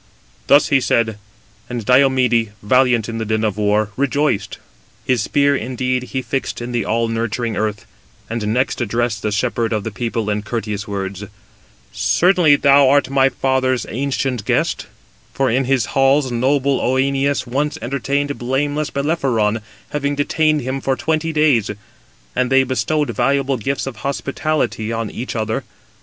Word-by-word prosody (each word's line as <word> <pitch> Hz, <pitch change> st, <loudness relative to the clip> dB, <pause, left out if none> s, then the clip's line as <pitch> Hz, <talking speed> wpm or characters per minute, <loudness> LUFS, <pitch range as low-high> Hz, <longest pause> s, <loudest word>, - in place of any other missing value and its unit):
Thus 145 Hz, +1 st, +5 dB
he 140 Hz, -2 st, +3 dB
said: 110 Hz, -3 st, +1 dB, 0.5 s
and 120 Hz, -3 st, -4 dB
Diomede, 125 Hz, -4 st, +3 dB
valiant 125 Hz, 0 st, +3 dB
in 115 Hz, -1 st, -4 dB
the -, -, -1 dB
din 110 Hz, 0 st, 0 dB
of 105 Hz, -3 st, 0 dB
war, 105 Hz, 0 st, +1 dB
rejoiced. 140 Hz, -7 st, 0 dB, 0.5 s
His 125 Hz, -4 st, +1 dB
spear 140 Hz, +5 st, +2 dB
indeed 125 Hz, +1 st, -1 dB
he 130 Hz, 0 st, -4 dB
fixed 130 Hz, +3 st, -3 dB
in 120 Hz, +1 st, -5 dB
the 120 Hz, -2 st, 0 dB
all 115 Hz, +1 st, +1 dB
nurturing 115 Hz, 0 st, -2 dB
earth, 105 Hz, -2 st, -2 dB, 0.4 s
and 115 Hz, -2 st, -3 dB
next 125 Hz, +4 st, 0 dB
addressed 115 Hz, 0 st, -1 dB
the 105 Hz, -, -1 dB
shepherd 115 Hz, +2 st, -1 dB
of 105 Hz, -2 st, -1 dB
the 110 Hz, -, -4 dB
people 115 Hz, 0 st, -3 dB
in 105 Hz, 0 st, -1 dB
courteous 105 Hz, -1 st, -4 dB
words: 100 Hz, 0 st, -4 dB, 0.7 s
"Certainly 175 Hz, -4 st, +3 dB
thou 140 Hz, -1 st, +5 dB
art 140 Hz, -1 st, +3 dB
my 135 Hz, -1 st, +4 dB
father's 130 Hz, -2 st, 0 dB
ancient 130 Hz, -2 st, -2 dB
guest; -, -, 0 dB, 0.5 s
for 135 Hz, -3 st, +1 dB
in 130 Hz, +3 st, +1 dB
his 130 Hz, -3 st, +1 dB
halls 135 Hz, 0 st, +3 dB
noble 135 Hz, +3 st, +1 dB
Œneus 135 Hz, +2 st, +1 dB
once 140 Hz, +5 st, -1 dB
entertained 140 Hz, +3 st, -2 dB
blameless 145 Hz, +4 st, -1 dB
Bellerophon, 130 Hz, -8 st, 0 dB, 0.3 s
having 145 Hz, -1 st, -1 dB
detained 155 Hz, +1 st, +1 dB
him 130 Hz, +2 st, -3 dB
for 135 Hz, 0 st, 0 dB
twenty 160 Hz, +2 st, -1 dB
days; 150 Hz, -9 st, +2 dB, 0.7 s
and 130 Hz, 0 st, 0 dB
they 135 Hz, 0 st, +5 dB
bestowed 145 Hz, +3 st, -1 dB
valuable 140 Hz, -1 st, +1 dB
gifts 135 Hz, +5 st, -2 dB
of 135 Hz, -4 st, -6 dB
hospitality 140 Hz, -2 st, -2 dB
on 115 Hz, -1 st, -3 dB
each 125 Hz, +2 st, -5 dB
other. 110 Hz, 0 st, -2 dB
130 Hz, 150 wpm, -19 LUFS, 115-140 Hz, 0.7 s, Thus